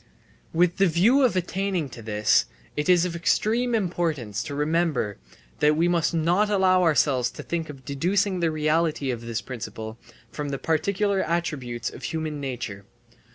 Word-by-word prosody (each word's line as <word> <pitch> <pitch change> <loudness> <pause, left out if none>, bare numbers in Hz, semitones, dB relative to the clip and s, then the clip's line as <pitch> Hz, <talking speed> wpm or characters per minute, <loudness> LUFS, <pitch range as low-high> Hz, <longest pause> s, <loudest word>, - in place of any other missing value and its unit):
With 175 +1 +2
the 195 0 +4
view 200 - +4
of 250 -7 +3
attaining 185 -2 -1
to 120 - -10
this, 105 -1 +2 0.3
it 150 +4 -1
is 180 -1 +5
of 175 -2 -3
extreme 230 +8 +1
importance 165 - -1
to 145 - -5
remember 150 -7 0 0.4
that 150 +1 +4
we 165 +3 +2
must 170 -2 +2
not 175 +6 +2
allow 190 -2 +4
ourselves 145 -7 +3
to - - -9
think 165 -2 -3
of 135 -3 -10
deducing 185 +7 0
the 170 -1 +2
reality 155 -2 0
of 120 -2 -4
this 115 -1 -3
principle 110 -2 -7 0.3
from 145 -1 -4
the 140 - -2
particular 195 +6 0
attributes 135 -9 -2
of - - -11
human 155 -2 -3
nature. 120 -7 -5
160 Hz, 160 wpm, -25 LUFS, 135-180 Hz, 0.4 s, is